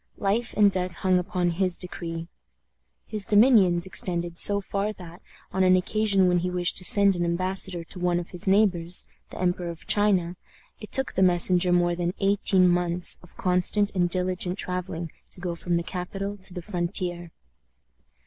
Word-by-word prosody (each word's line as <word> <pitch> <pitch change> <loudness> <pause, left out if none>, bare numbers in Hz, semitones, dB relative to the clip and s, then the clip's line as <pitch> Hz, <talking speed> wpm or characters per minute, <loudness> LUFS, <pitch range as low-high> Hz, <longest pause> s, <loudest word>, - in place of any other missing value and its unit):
Life 220 +3 -2
and 205 -1 +5
death 180 -1 -1
hung 185 0 +1
upon 180 -1 -2
his 180 +1 0
decree. 165 -2 -6 0.8
His 215 -2 -2
dominions 205 -5 +4
extended 175 -2 -2
so 200 0 +6
far 200 +1 -3
that, 175 -2 -13 0.3
on 190 - 0
an 185 0 +5
occasion 195 0 +1
when 180 -1 +2
he 180 +1 -2
wished 180 0 0
to 185 - -3
send 200 +1 +5
an 175 - -2
embassador 185 +1 -2
to 180 - -9
one 175 -1 0
of 175 - -9
his 180 -1 -6
neighbors 185 -4 +2 0.2
the - - -10
Emperor 180 -1 -1
of 170 0 -10
China 185 -4 +1 0.4
it 210 - -11
took 265 0 +2
the 190 - -1
messenger 180 0 +3
more 175 0 +2
than 175 +1 -3
eighteen 195 -2 +2
months 175 0 +2
of 180 - -19
constant 185 +3 +2
and 175 -2 0
diligent 180 0 -2
traveling 180 -3 -5 0.2
to - - -7
go 175 -1 -4
from 170 +1 -3
the 170 - -1
capital 195 +3 -5
to 190 -1 -3
the 180 -1 -8
frontier. 175 -2 -4
180 Hz, 175 wpm, -25 LUFS, 175-195 Hz, 0.8 s, so